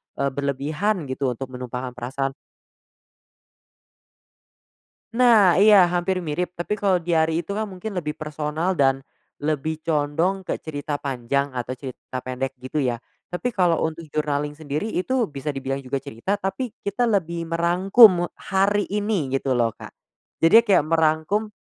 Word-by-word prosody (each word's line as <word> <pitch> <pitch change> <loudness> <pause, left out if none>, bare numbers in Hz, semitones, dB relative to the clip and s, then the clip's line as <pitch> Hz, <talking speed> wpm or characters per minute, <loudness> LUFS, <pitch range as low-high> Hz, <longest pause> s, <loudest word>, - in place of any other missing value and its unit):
eee, 140 0 0
berlebihan 150 +8 -1
gitu 130 -1 -1
untuk 130 +2 -7
menumpahkan 125 0 -5
perasaan" 130 +3 -3 2.8
Nah! 225 -7 +5
Iya, 210 +1 +7 0.2
hampir 180 +1 0
mirip, 175 +3 -3
tapi 175 +4 -3
kalau 195 -2 +3
diari 165 0 +1
itu - - -7
kan 215 +2 -2
mungkin 190 +2 -7
lebih 150 -3 -4
personal 155 +3 -2
dan 135 -1 +3 0.4
lebih 155 +1 -2
condong 160 +4 +1
ke - - 0
cerita 145 -1 -4
panjang 140 +1 -1
atau 125 0 -4
cerita 130 -1 -7
pendek 130 +1 -4
gitu 130 +4 -2
ya. 125 -4 +1 0.4
Tapi 210 +8 -2
kalau 180 -6 +2
untuk 160 0 -4
journaling 150 -1 -1
sendiri 155 +5 -3
itu 240 +5 0
bisa 145 -1 -4
dibilang 135 0 -3
juga 135 +1 -2
cerita, 140 - -3
tapi 200 +6 -3
kita 200 +4 -2
lebih 170 -4 0
merangkum, 180 +7 +6
me - - +1
hari 200 +2 +1
ini 205 -6 -1
gitu 135 0 -1
loh, 120 -3 +1
Kak. - - -11 0.5
Jadi 220 +8 +7
kayak 195 -8 +4
merangkum 160 +6 +1
155 Hz, 145 wpm, -23 LUFS, 135-190 Hz, 2.8 s, Iya